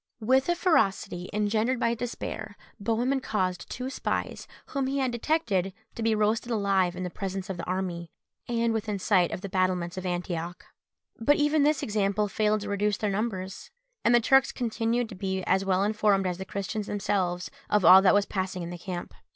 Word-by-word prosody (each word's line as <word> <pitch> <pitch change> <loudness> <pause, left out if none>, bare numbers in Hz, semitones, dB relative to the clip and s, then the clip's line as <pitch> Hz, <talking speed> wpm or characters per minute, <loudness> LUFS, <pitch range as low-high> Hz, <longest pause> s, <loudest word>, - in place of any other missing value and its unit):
With 260 +6 +2
a 345 - +3
ferocity, 195 - +1
engendered 215 +4 +1
by 230 -1 +2
despair, 225 -3 -5 0.2
Bohemund 240 +6 0
caused 185 -7 -2
two 255 +2 -4
spies, - - -3 0.2
whom 275 -2 -1
he 275 +1 -1
had 260 -2 +1
detected, 225 - 0 0.2
to - - -7
be 225 -1 +2
roasted 215 +3 +1
alive 195 -5 +1
in 180 0 -3
presence 195 0 -4
of 185 - -5
the 170 - -5
army, 180 -2 -3 0.4
and 235 -1 +1
within 215 -2 -2
sight 185 -3 +3
of - - -4
the 200 - -4
battlements 185 -2 0
of 185 - -4
Antioch. 175 -1 -4 0.5
But 290 +6 +4
even 295 +1 +2
this 295 -1 +2
example 205 -1 +1
failed 215 +1 +1
to 205 - -5
reduce 205 0 0
their 210 -2 -1
numbers, 195 -2 -3 0.3
and 235 - +5
the - - +7
Turks 270 +3 +4
continued 235 0 -1
to - - -8
be 190 -1 -3
as 190 +1 +2
well 190 0 +2
informed 210 -2 +2
as 180 0 -2
the 190 - -5
Christians 200 +2 -4
themselves 185 -3 -1 0.2
of 210 -4 +3
all 185 +3 +10
that 195 +1 +5
was 205 0 +3
passing 185 -2 -3
in 170 - -6
the 175 - -7
camp. 175 -1 -6
205 Hz, 190 wpm, -27 LUFS, 185-230 Hz, 0.5 s, all